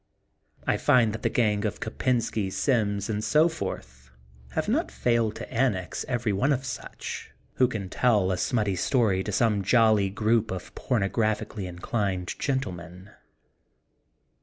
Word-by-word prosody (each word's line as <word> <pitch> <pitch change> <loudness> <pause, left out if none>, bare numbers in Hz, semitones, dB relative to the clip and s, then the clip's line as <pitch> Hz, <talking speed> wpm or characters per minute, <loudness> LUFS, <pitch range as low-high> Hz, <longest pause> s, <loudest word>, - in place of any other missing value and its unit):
I - - +2
find 115 -4 +3
that 110 - -5
the - - +1
gang 105 -4 +1
of 105 -2 -2
Kopensky, 110 -3 -1
Sims, 100 -5 0
and 105 -1 -2
so 155 +6 +4
forth 65 - -6 0.4
have - - -1
not - - +1
failed 110 - +1
to - - -8
annex 110 -7 0
every 120 -4 0
one 130 +9 +2
of 135 -1 0
such, - - -6 0.3
who 130 - +5
can 110 -6 -4
tell 105 -2 +2
a 90 - 0
smutty 105 -6 0
story 105 -4 +2
to 105 - -4
some 105 0 +2
jolly 110 -1 +4
group 110 +3 +1
of 90 -2 -6
porno 115 -7 0
graphically 110 -2 -1
inclined 90 0 -2
gentlemen. 95 - -4
105 Hz, 145 wpm, -26 LUFS, 95-120 Hz, 0.4 s, who